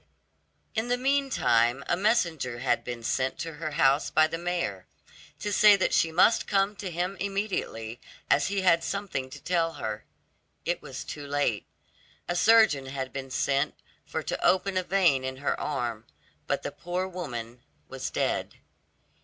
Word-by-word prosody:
In 220 Hz, +2 st, -1 dB
the 245 Hz, 0 st, +1 dB
meantime 245 Hz, -, +2 dB
a -, -, +2 dB
messenger 170 Hz, -, +1 dB
had 125 Hz, +1 st, 0 dB
been 120 Hz, -1 st, -6 dB
sent 130 Hz, +3 st, 0 dB
to 165 Hz, 0 st, -5 dB
her 155 Hz, +1 st, -4 dB
house 140 Hz, 0 st, +3 dB
by 155 Hz, -, +5 dB
the 165 Hz, +1 st, -4 dB
mayor, 170 Hz, -, -3 dB, 0.5 s
to 205 Hz, -, -3 dB
say 210 Hz, +1 st, +7 dB
that 195 Hz, -, 0 dB
she 165 Hz, -, +3 dB
must 185 Hz, +7 st, +4 dB
come 200 Hz, +1 st, +2 dB
to 195 Hz, -, -5 dB
him 180 Hz, +3 st, -2 dB
immediately, 190 Hz, -, -3 dB, 0.3 s
as -, -, +3 dB
he 195 Hz, 0 st, -1 dB
had 170 Hz, -3 st, +4 dB
something 195 Hz, -11 st, -3 dB
to 145 Hz, +2 st, -10 dB
tell 165 Hz, +2 st, 0 dB
her. 110 Hz, -5 st, -5 dB, 0.6 s
It -, -, -1 dB
was -, -, -7 dB
too 145 Hz, -1 st, -7 dB
late; 140 Hz, -7 st, 0 dB, 0.6 s
a 175 Hz, -, -1 dB
surgeon 210 Hz, -10 st, +5 dB
had 130 Hz, -1 st, -5 dB
been 135 Hz, -1 st, -5 dB
sent 140 Hz, +2 st, 0 dB, 0.3 s
for -, -, -4 dB
to -, -, -4 dB
open 190 Hz, +1 st, +3 dB
a 185 Hz, -, +2 dB
vein 175 Hz, -8 st, +2 dB
in 130 Hz, 0 st, -4 dB
her 140 Hz, -, -1 dB
arm, 120 Hz, -6 st, -3 dB, 0.4 s
but -, -, -1 dB
the -, -, -3 dB
poor 180 Hz, +2 st, -3 dB
woman 125 Hz, -10 st, -6 dB, 0.3 s
was 135 Hz, -1 st, -5 dB
dead. -, -, -1 dB
160 Hz, 165 wpm, -28 LUFS, 130-190 Hz, 0.6 s, say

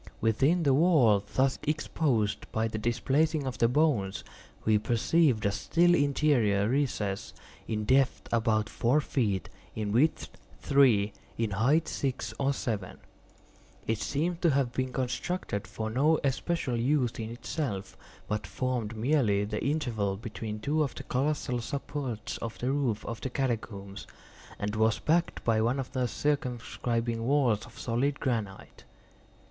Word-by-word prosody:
Within 135 Hz, +11 st, +2 dB
the 140 Hz, -3 st, +4 dB
wall 130 Hz, -, +4 dB
thus 135 Hz, 0 st, +2 dB
exposed 145 Hz, -7 st, -1 dB
by 110 Hz, +1 st, 0 dB
the 110 Hz, -1 st, -4 dB
displacing 135 Hz, +7 st, +1 dB
of 130 Hz, -2 st, -4 dB
the 115 Hz, -, +5 dB
bones, 125 Hz, -8 st, +1 dB, 0.4 s
we 110 Hz, -1 st, +4 dB
perceived 120 Hz, +2 st, +2 dB
a 100 Hz, -, +3 dB
still 175 Hz, +11 st, +3 dB
interior 140 Hz, -9 st, +2 dB
recess, 115 Hz, -7 st, -1 dB, 0.3 s
in 110 Hz, -1 st, -2 dB
depth 130 Hz, +2 st, +2 dB
about 110 Hz, -2 st, +2 dB
four 125 Hz, +6 st, +2 dB
feet, 110 Hz, -10 st, -1 dB, 0.3 s
in 105 Hz, -2 st, -2 dB
width 140 Hz, +9 st, +2 dB, 0.3 s
three, 120 Hz, -8 st, +4 dB, 0.2 s
in 115 Hz, -2 st, -1 dB
height 130 Hz, -, +2 dB
six 135 Hz, -2 st, -3 dB
or 140 Hz, 0 st, +2 dB
seven. 110 Hz, -8 st, -3 dB, 0.9 s
It 110 Hz, -1 st, -1 dB
seemed 165 Hz, -, -1 dB
to 170 Hz, -, +4 dB
have 135 Hz, -4 st, +1 dB
been 130 Hz, +1 st, -1 dB
constructed 125 Hz, -, -3 dB
for 110 Hz, 0 st, -4 dB
no 150 Hz, +6 st, +3 dB
especial 135 Hz, -1 st, -1 dB
use 125 Hz, 0 st, +1 dB
in 110 Hz, -1 st, -4 dB
itself, 120 Hz, -, -4 dB, 0.3 s
but 105 Hz, -3 st, -2 dB
formed 115 Hz, +1 st, -2 dB
merely 110 Hz, -5 st, +2 dB
the 105 Hz, +1 st, -3 dB
interval 115 Hz, -10 st, -1 dB
between 110 Hz, 0 st, -6 dB
two 150 Hz, +7 st, +1 dB
of 140 Hz, -4 st, -1 dB
the -, -, -7 dB
colossal 135 Hz, -2 st, -1 dB
supports 125 Hz, -4 st, -4 dB
of 115 Hz, -1 st, -5 dB
the 125 Hz, +2 st, -1 dB
roof 135 Hz, -7 st, -1 dB
of 115 Hz, -1 st, -5 dB
the 130 Hz, -, -3 dB
catacombs, 110 Hz, -7 st, -3 dB, 0.5 s
and 105 Hz, +1 st, -3 dB
was 110 Hz, 0 st, +3 dB
backed 170 Hz, +2 st, 0 dB
by 110 Hz, -2 st, +2 dB
one 120 Hz, +5 st, +1 dB
of 130 Hz, -, -4 dB
their 125 Hz, -2 st, 0 dB
circumscribing 120 Hz, -4 st, -1 dB
walls 125 Hz, -5 st, +2 dB
of 115 Hz, -, -16 dB
solid 135 Hz, +4 st, -1 dB
granite. 110 Hz, -7 st, -3 dB
120 Hz, 145 wpm, -29 LUFS, 110-140 Hz, 0.9 s, the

